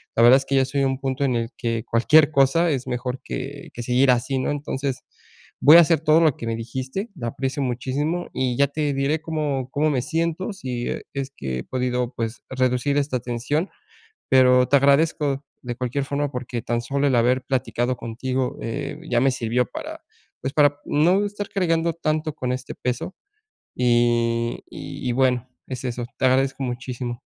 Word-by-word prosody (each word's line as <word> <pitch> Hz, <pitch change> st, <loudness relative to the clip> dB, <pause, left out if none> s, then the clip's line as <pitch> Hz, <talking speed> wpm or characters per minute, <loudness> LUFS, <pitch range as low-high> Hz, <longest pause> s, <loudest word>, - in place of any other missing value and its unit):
la 115 Hz, -, +4 dB
verdad 125 Hz, +3 st, +8 dB
es 135 Hz, -, -3 dB
que 135 Hz, -, 0 dB
ya 135 Hz, -, +5 dB
estoy 135 Hz, +2 st, -2 dB
en 135 Hz, -, +3 dB
un 130 Hz, 0 st, -1 dB
punto 135 Hz, +1 st, -1 dB
en 125 Hz, -3 st, +1 dB
el 115 Hz, 0 st, -1 dB
que 115 Hz, -2 st, -2 dB
cualquier 145 Hz, +7 st, +4 dB
cosa 150 Hz, +4 st, +3 dB
es 130 Hz, -3 st, -2 dB
mejor 125 Hz, +1 st, -3 dB
que 140 Hz, +2 st, -6 dB
que 120 Hz, -, -6 dB
seguir 125 Hz, +2 st, +3 dB
así, 125 Hz, +2 st, 0 dB
¿no?, 130 Hz, -, -1 dB
entonces, 140 Hz, -2 st, -3 dB, 0.6 s
voy 150 Hz, +3 st, +9 dB
a -, -, +10 dB
hacer 165 Hz, -2 st, +3 dB
todo 160 Hz, +1 st, +4 dB
lo 155 Hz, -5 st, +3 dB
que 115 Hz, -, -6 dB
me 115 Hz, -, -1 dB
dijiste. 130 Hz, -, -4 dB
La 120 Hz, -7 st, -4 dB
aprecio 135 Hz, +4 st, -3 dB
muchísimo 140 Hz, +7 st, -2 dB
y 130 Hz, -2 st, 0 dB
ya 140 Hz, -, +4 dB
te 145 Hz, 0 st, -1 dB
diré 140 Hz, +3 st, 0 dB
cómo 150 Hz, -5 st, -2 dB
cómo 155 Hz, +2 st, +1 dB
me 135 Hz, -4 st, +1 dB
siento, 165 Hz, -, -1 dB
si 125 Hz, -10 st, -4 dB
e -, -, -4 dB
es 135 Hz, -1 st, -4 dB
que 70 Hz, -, -6 dB
he -, -, -5 dB
podido, 125 Hz, -1 st, -1 dB
pues, 115 Hz, 0 st, -4 dB
reducir 130 Hz, +2 st, +1 dB
esta 140 Hz, -3 st, 0 dB
tensión. 125 Hz, -, -2 dB, 0.6 s
Pero 125 Hz, -1 st, +6 dB
te 140 Hz, -, +6 dB
agradezco 140 Hz, 0 st, +2 dB, 0.2 s
de 120 Hz, -1 st, -4 dB
cualquier 125 Hz, +3 st, -2 dB
forma, 140 Hz, 0 st, -2 dB
porque 125 Hz, -2 st, -4 dB
tan 120 Hz, +1 st, -1 dB
solo 140 Hz, +4 st, 0 dB
el 135 Hz, -, +2 dB
haber 125 Hz, +2 st, +3 dB
platicado 125 Hz, -1 st, -1 dB
contigo, 125 Hz, +3 st, -3 dB
eh, 140 Hz, +5 st, -4 dB
ya 120 Hz, -, +3 dB
me 135 Hz, -, +4 dB
sirvió 125 Hz, 0 st, 0 dB
para, -, -, -7 dB, 0.4 s
pues, 135 Hz, +1 st, -3 dB
para 145 Hz, -1 st, +4 dB
no 180 Hz, +7 st, +3 dB
estar 205 Hz, 0 st, -5 dB
cargando 165 Hz, -3 st, +1 dB
tanto 155 Hz, -2 st, -1 dB
con 125 Hz, -3 st, -2 dB
este 130 Hz, +1 st, -6 dB
peso. 125 Hz, +9 st, -3 dB, 0.6 s
Y 120 Hz, -1 st, +2 dB
y 125 Hz, -2 st, -5 dB
bueno, 130 Hz, -1 st, +1 dB, 0.2 s
es 130 Hz, -2 st, -5 dB
eso. 120 Hz, -1 st, -3 dB
Te -, -, +2 dB
agradezco 135 Hz, +1 st, +2 dB
muchísimo. 125 Hz, -1 st, -4 dB
130 Hz, 190 wpm, -23 LUFS, 125-145 Hz, 0.6 s, a